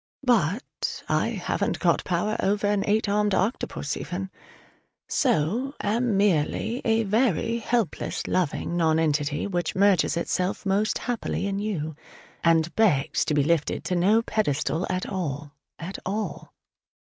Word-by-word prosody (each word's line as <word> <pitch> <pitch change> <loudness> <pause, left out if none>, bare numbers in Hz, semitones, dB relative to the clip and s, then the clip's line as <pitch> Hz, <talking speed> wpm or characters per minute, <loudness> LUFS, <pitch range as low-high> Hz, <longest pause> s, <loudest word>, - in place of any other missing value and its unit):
But 225 - 0
I - - +1
haven't - - -1
got - - +2
power 185 +5 0
over 200 +1 +1
an 205 -1 +2
eight 215 +1 +2
armed 205 0 +2
octopus 190 - -1
even: 185 +4 -5 0.8
so 245 - +1
am 220 0 +1
merely 205 - +1
a 225 0 +2
very 225 +1 +1
helpless 230 -3 -1
loving 175 -1 -1
nonentity 155 -3 +1
which 175 -5 -2
merges 195 -3 +3
itself 180 +4 -1
most 200 +2 +1
happily 240 -4 -2
in 200 0 -1
you, 165 -8 -3 0.5
and 165 0 +3
begs 180 -12 +2
to 150 - 0
be 145 - +3
lifted 160 0 0
to 180 - -1
no 205 +6 +3
pedestal 165 -5 0
at 185 0 -2
all, 150 -6 -4 0.3
at 175 +4 -6
all. 200 -3 -4
195 Hz, 135 wpm, -25 LUFS, 165-215 Hz, 0.8 s, merges